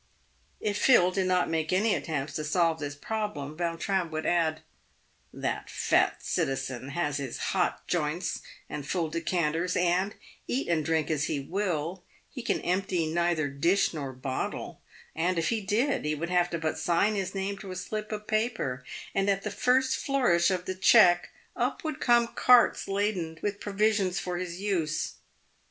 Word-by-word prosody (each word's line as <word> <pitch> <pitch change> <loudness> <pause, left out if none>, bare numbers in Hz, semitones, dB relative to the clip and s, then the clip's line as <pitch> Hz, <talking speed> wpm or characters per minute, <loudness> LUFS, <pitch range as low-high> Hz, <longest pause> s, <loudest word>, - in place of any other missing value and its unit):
If 205 -1 -1
Phil 185 -9 +5
did 185 0 0
not 180 -1 +2
make 160 0 -1
any 205 +4 +3
attempts 150 -6 -3
to 155 - -3
solve 165 +1 +1
this 145 -1 -4
problem, 155 -5 -4
Vautrin 170 +2 -1
would 155 0 -4
add, 160 -2 +1 0.4
" - - -39 0.2
That - - -3
fat - - +1
citizen 135 -1 -2
has 145 -1 -1
his 135 -4 -4 0.2
hot - - 0
joints 165 +1 -1 0.3
and 145 - -5
full 170 -2 -1
decanters, 165 +1 0
and, 180 +3 +1 0.3
eat 265 - -1
and 165 -2 +1
drink 160 0 0
as 155 -1 +1
he 150 - -1
will, 175 +1 -2 0.3
he 255 - -6
can 235 - -1
empty 180 -1 0
neither 170 -3 +1
dish 170 +9 +2
nor 140 -4 -4
bottle; 130 +1 -4 0.3
and, 175 +2 0
if 165 - +1
he 225 -2 0
did, 230 +8 +1
he 150 0 0
would 170 +4 -4
have 175 -1 +3
but 170 -2 -3
to 160 -1 0
sign 175 +5 +2
his 195 -1 -3
name 195 +1 -2
to 195 - -9
a 185 - -5
slip 215 +4 -4
of 210 0 -4
paper, 215 - -1 0.3
and 195 +1 +1
at 195 0 +1
the - - -3
first 260 +1 +2
flourish 240 -12 +2
of 180 -1 -1
the 185 - -2
cheque, 185 -2 +5 0.3
up - - -1
would 310 -3 -3
come 240 -1 +4
carts 250 0 +4
laden 195 -5 -1
with 205 -1 -2
provisions 205 -2 +1
for 180 -1 -2
his 180 -1 -5
use. 175 -7 -1
175 Hz, 175 wpm, -28 LUFS, 160-200 Hz, 0.4 s, Phil